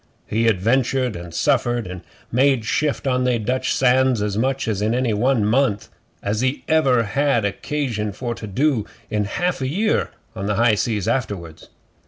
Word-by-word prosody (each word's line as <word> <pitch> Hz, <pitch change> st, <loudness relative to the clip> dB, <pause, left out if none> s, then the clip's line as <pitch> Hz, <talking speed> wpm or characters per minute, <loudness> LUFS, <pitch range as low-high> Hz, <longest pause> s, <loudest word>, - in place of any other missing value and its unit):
He 115 Hz, +2 st, 0 dB
adventured 120 Hz, +4 st, +1 dB
and 85 Hz, 0 st, -8 dB
suffered 120 Hz, +7 st, +1 dB
and 90 Hz, -1 st, -7 dB, 0.3 s
made 130 Hz, -1 st, +3 dB
shift 145 Hz, +5 st, 0 dB
on 130 Hz, -1 st, +1 dB
they 125 Hz, -1 st, +2 dB
Dutch 125 Hz, +4 st, -1 dB
sands 130 Hz, -1 st, +3 dB
as 105 Hz, -1 st, -1 dB
much 130 Hz, +4 st, 0 dB
in 110 Hz, +1 st, 0 dB
any 125 Hz, -3 st, +1 dB
one 115 Hz, +1 st, +2 dB
month 110 Hz, -2 st, +1 dB, 0.3 s
as 105 Hz, +4 st, -1 dB, 0.2 s
ever 135 Hz, -7 st, +3 dB
he 105 Hz, -, -6 dB
had 140 Hz, -6 st, +2 dB
occasion 110 Hz, 0 st, -2 dB
for 120 Hz, +4 st, -4 dB
to 110 Hz, -, -8 dB
do 130 Hz, +3 st, +1 dB, 0.3 s
in 105 Hz, -1 st, 0 dB
a 100 Hz, -, -6 dB
half 180 Hz, -4 st, 0 dB
year 185 Hz, +12 st, 0 dB, 0.3 s
on 100 Hz, -, -4 dB
the 105 Hz, -, 0 dB
high 115 Hz, +1 st, +4 dB
seas 105 Hz, -2 st, -1 dB
afterwards. 95 Hz, -10 st, -3 dB
120 Hz, 170 wpm, -21 LUFS, 105-130 Hz, 0.3 s, high